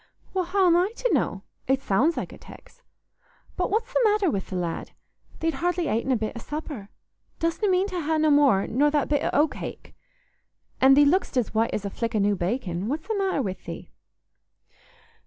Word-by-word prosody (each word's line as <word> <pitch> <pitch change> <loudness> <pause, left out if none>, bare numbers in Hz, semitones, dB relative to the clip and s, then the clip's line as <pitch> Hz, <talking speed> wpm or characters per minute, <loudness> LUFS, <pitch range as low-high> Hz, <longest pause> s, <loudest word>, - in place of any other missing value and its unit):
"Well, 370 -1 0
how'm 360 -1 +3
I 360 +4 +2
to - - 0
know? 195 0 0 0.2
It 265 +1 +1
sounds 270 +12 +2
like - - -4
a - - -11
tex. - - -15 0.7
But 360 - -1
what's 455 +4 -1
th' - - +2
matter 420 -5 +3
wi' 200 - 0
th' 190 - -10
lad? 175 -2 -3 0.5
Thee't 325 0 +1
hardly 350 -1 -1
atin' 230 +3 0
a - - +4
bit 220 +1 -3
o' - - -5
supper. 290 -6 -6 0.5
Dostna 335 +5 0
mean 370 +1 +3
to 365 -2 -3
ha' 315 +1 0
no 310 -1 +3
more 280 -9 +4
nor 285 +5 +2
that 295 -1 0
bit 290 -1 +1
o' - - +1
oat 295 +2 +3
cake? - - -8 0.9
An' 265 +1 +7
thee 290 +1 +6
lookst 315 -2 +1
as 245 - 0
white 225 +1 +1
as 205 - -4
a 200 - -3
flick 230 +2 -3
o' - - +3
new 205 0 +2
bacon. 185 -1 -2
What's 305 +5 -3
th' - - -3
matter 385 -8 0
wi' 190 -4 -3
thee?" - - -8
290 Hz, 205 wpm, -25 LUFS, 220-355 Hz, 0.9 s, An